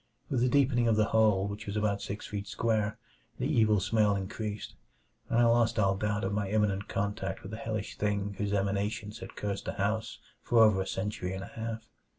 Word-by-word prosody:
With 130 - +2
the 125 +1 +3
deepening 130 -3 +3
of 115 - +4
the 110 0 +3
hole, 105 -3 +4
which 105 +2 -6
was 100 +1 -2
about 105 -1 0
six 100 +1 -5
feet 100 -1 -5
square, 110 -1 0 0.4
the 125 - -2
evil 110 -8 +3
smell 105 +2 +2
increased; 105 +2 -4 0.6
and 115 - +1
I 120 - +6
lost 115 -1 +3
all 100 -2 +3
doubt 105 +1 -1
of 95 - -1
my 100 -1 -1
imminent 105 -1 +1
contact 100 -1 -2
with 95 - -8
the 110 - -5
hellish 110 -2 -4
thing 100 -1 0
whose 100 -1 -1
emanations 100 +2 -1
had - - -9
cursed 100 -1 -3
the - - -2
house 110 +3 -1 0.2
for 115 -1 +5
over 105 -3 +5
a 95 - -3
century 95 -2 -3
and 95 - -5
a - - -7
half. 115 0 -5
105 Hz, 205 wpm, -30 LUFS, 100-110 Hz, 0.6 s, I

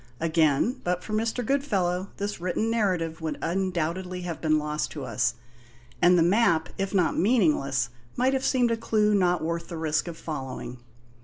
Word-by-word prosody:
Again, 160 - +2
but 180 0 -1
for 215 - -6
Mr. 225 +2 -1
Goodfellow 195 -9 0
this 200 -3 -4
written 185 +5 0
narrative 180 -8 0
would 160 -1 -3
undoubtedly 180 0 -2
have 170 -2 -5
been 155 -1 +3
lost 150 0 -2
to 145 -4 -5
us, 120 0 0 0.7
and 180 +1 +6
the 165 - +5
map, 175 -3 +3
if 195 0 -1
not 180 -5 +2
meaningless, 150 - +2 0.3
might 255 +2 +2
have 265 0 0
seemed 245 -4 +2
a 230 - +1
clue 215 -2 +2
not 180 -4 +2
worth 170 +1 -2
the 170 - -6
risk 160 +1 0
of 170 -1 -6
following. 130 -5 -6
175 Hz, 170 wpm, -26 LUFS, 160-210 Hz, 0.7 s, and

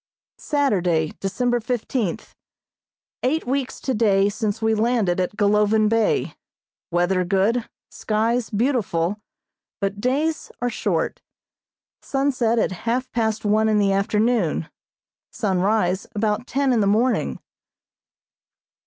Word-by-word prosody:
Saturday, 180 - +1
December 240 +5 0
fifteenth: 235 -4 -3 0.9
Eight 295 +6 0
weeks 265 +1 -2
today 210 -6 +2
since 210 0 -2
we 220 0 +1
landed 220 -5 +1
at 185 +3 -2
Golovin 210 +1 +3
Bay. 225 -1 +1 0.6
Weather 175 +2 +1
good, 200 +6 +1 0.2
skies 225 +2 0
beautiful, 210 -5 0 0.6
but 200 0 -2
days 300 +6 -1
are 245 0 -1
short. - - -1 0.8
Sunset 265 -4 0
at 225 - +1
half 235 +7 -2
past 220 -2 -1
one 215 +1 +3
in 215 - +3
the 200 -1 +3
afternoon; 210 -4 +1 0.6
sunrise 190 -1 0
about 215 +2 -1
ten 275 -1 +1
in 235 - +2
the 200 - +2
morning. 230 +5 +1
220 Hz, 110 wpm, -22 LUFS, 200-245 Hz, 0.9 s, Golovin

